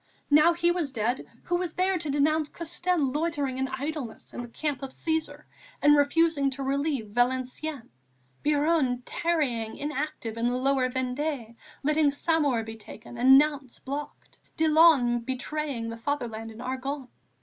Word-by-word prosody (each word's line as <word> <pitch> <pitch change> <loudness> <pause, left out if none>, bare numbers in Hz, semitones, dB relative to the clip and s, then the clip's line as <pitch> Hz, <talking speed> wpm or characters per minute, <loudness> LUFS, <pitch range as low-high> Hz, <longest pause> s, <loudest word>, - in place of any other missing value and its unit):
Now 305 +4 +6
he 345 +1 +2
was 340 -6 -1
dead, 240 +1 -1 0.2
who 350 - 0
was 350 -3 -3
there 375 +1 +1
to 310 -2 -4
denounce 300 +2 +2
Custine 335 -3 -1
loitering 290 -4 -1
in 265 - 0
idleness 265 -2 -5
in - - -5
the 240 - -7
Camp 290 +4 -3
of 270 - -5
Cæsar 300 0 -2 0.4
and 295 0 +6
refusing 290 0 +3
to 270 +1 -5
relieve 275 -4 -1
Valenciennes, 255 +3 -1 0.6
Biron 290 -4 +2
tarrying 270 -10 -1
inactive 290 -5 -4
in 230 +1 +1
the 245 +1 0
Lower 260 0 +2
Vendée 255 -1 -3 0.3
letting 300 +1 +3
Saumur 285 -5 +1
be 225 0 -7
taken 220 +2 -11
and 260 +3 +7
Nantes 285 -3 +1
blockaded, 285 +2 -7 0.2
Dillon 310 -6 +5
betraying 260 -1 -3
the 230 - -7
Fatherland 230 -4 -3
in 220 - -11
the 240 - -8
Argonne?... 265 +1 -4
280 Hz, 150 wpm, -27 LUFS, 250-310 Hz, 0.6 s, and